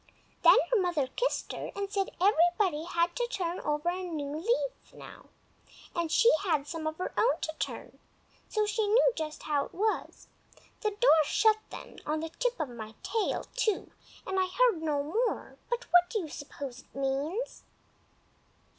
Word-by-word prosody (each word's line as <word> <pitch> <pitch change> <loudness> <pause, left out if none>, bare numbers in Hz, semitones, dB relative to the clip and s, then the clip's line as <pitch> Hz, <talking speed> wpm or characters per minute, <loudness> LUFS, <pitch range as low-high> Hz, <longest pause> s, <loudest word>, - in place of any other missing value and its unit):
Then - - +8
her 465 -5 +4
mother 345 -6 +1
kissed - - -2
her, - - -5
and 400 0 -3
said 390 -2 0
everybody 350 -3 +3
had 340 0 0
to 485 -1 0
turn 360 -6 -2
over 300 +4 0
new 300 -5 -4
leaves 475 +9 -2
now, - - -12 0.7
and 335 -2 -1
she 470 +5 +6
had 310 -7 +1
some 315 0 -4
of 315 0 -3
her 365 - -4
own 480 - +3
to 315 - -2
turn, - - -5 0.5
so 430 -1 +1
she 420 0 0
knew 475 +4 +5
just 310 -1 -5
how 290 -2 +1
it - - -15
was. 430 +4 -1 0.6
The 425 - +1
door 410 -7 +5
shut 430 +6 +3
then—on 310 +1 -5
the 325 - -4
tip - - -2
of 310 -4 -1
my 220 -2 -8
tail, 410 +2 -1
too—and 415 -4 -2
I 370 - +2
heard 440 -2 +3
no 295 -3 0
more; 435 +12 -1
but 480 +1 -1
what 355 0 +6
do 445 - -1
you 320 - -6
suppose 280 -3 -7
it - - -20
means?" 275 - -2
350 Hz, 165 wpm, -30 LUFS, 310-430 Hz, 0.7 s, Then